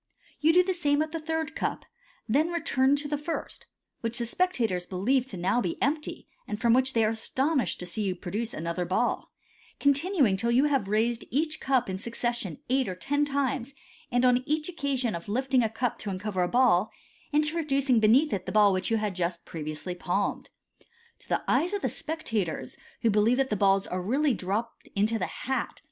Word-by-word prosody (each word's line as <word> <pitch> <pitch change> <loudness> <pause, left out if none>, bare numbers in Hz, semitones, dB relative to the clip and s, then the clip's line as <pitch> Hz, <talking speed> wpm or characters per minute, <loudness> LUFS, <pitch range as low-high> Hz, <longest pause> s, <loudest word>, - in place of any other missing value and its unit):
You 310 +2 +5
do 360 +2 +5
the 375 +1 0
same 290 -5 +1
with 310 +1 0
the 330 - -3
third 320 -1 -3
cup, - - -2 0.4
then 290 +9 +2
return 285 -5 +2
to 290 +1 -3
the 295 0 -2
first 320 +3 -5 0.3
(which 230 0 -3
the 240 - -2
spectators 230 - 0
believe 245 +8 +1
to 200 - -7
be - - -7
now 200 +7 +2 0.2
empty, 300 +3 -2 0.2
and 210 - -4
from 235 -1 +4
which 260 +2 +2
they 225 -1 +3
are 215 - +2
astonished 260 - 0
to - - -4
see 180 +5 -4
you 190 -3 0
produce 215 +6 -3
another 170 +2 -3
ball), 190 +7 -1 0.5
continuing 280 - +3
till 235 +4 0
you 245 +3 +4
have 275 -8 +1
raised 225 +3 0
each 310 +3 -1
cup 265 -3 +1
in 190 0 -4
succession 235 -5 -3
eight 260 0 +1
or 185 - -3
ten 285 +9 0
times, 275 -2 -1 0.4
and, 245 +1 +3
on 250 0 +4
each 305 +1 0
occasion 280 -8 -1
of 170 +3 -6
lifting 260 +3 +2
a 225 - +1
cup 230 +2 -2
to 210 - -5
uncover 190 0 -2
a 180 - +2
ball, 225 -4 +3 0.4
introducing 295 -4 +2
beneath 245 +8 +4
it 195 - -3
the - - -2
ball 210 -2 +5
which 185 - -1
you 225 - +2
had 210 -2 -1
just 175 -1 -3
previously 155 +2 -5
palmed. 180 +3 -2 0.7
To - - -19
the - - 0
eyes 360 +5 +2
of 405 - -4
the - - +1
spectators, 225 - -3 0.3
who 230 - +4
believe 215 +4 +3
that 265 -2 +1
the - - +2
balls 195 0 +3
are 180 0 -3
really 270 +9 +1
dropped 210 +4 -3
into 215 +3 +1
the 180 - -1
hai. 265 -2 -2
240 Hz, 200 wpm, -28 LUFS, 200-285 Hz, 0.7 s, You